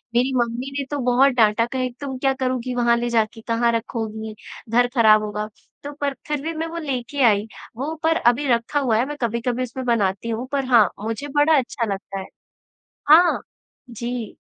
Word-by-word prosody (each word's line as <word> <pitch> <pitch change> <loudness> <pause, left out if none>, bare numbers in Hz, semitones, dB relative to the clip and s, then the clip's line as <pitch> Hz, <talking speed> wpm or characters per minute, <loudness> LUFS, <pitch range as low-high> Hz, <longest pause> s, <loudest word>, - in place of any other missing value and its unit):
मेरी 255 +2 +2
मम्मी 240 +2 -1
ने - - -1
तो 290 - -1
बहुत 255 +3 +4
डाँटा 230 -1 +3
कहे 255 +1 -2
"तुम 265 -2 -4
क्या 270 +1 +1
करूँगी 255 -1 -1
वहाँ 235 -1 +3
ले 240 0 -1
जाके? 225 0 0
कहाँ 235 0 +2
रखोगी? 220 -2 -4 0.3
घर 245 +2 +3
खराब 215 -2 +6
होगा।" 210 0 -3 0.4
तो 290 - -5
पर 280 -1 0
फिर 295 -2 -2
भी 325 +3 -3
मैं 325 +1 -2
वो 335 - -7
लेके 280 -3 -3
आई। 210 -2 +3 0.3
वो 290 +5 -3
पर 325 0 +3
अभी 250 +1 +2
रखा 240 +4 +1
हुआ 240 -6 +1
है, 240 - +2
मैं 295 +1 -6
कभी-कभी 235 +2 -1
उसमें 255 +1 -6
बनाती 215 -2 0
हूँ 230 +3 -3
पर 275 -2 0
हाँ, 235 -6 +5 0.2
मुझे 225 +6 -4
बड़ा 295 +1 +5
अच्छा 245 -2 -1
लगता 195 0 -6
है। 190 - -7 0.8
हाँ। 340 +3 +6 0.5
जी। 235 -1 -5
245 Hz, 190 wpm, -22 LUFS, 230-270 Hz, 0.8 s, खराब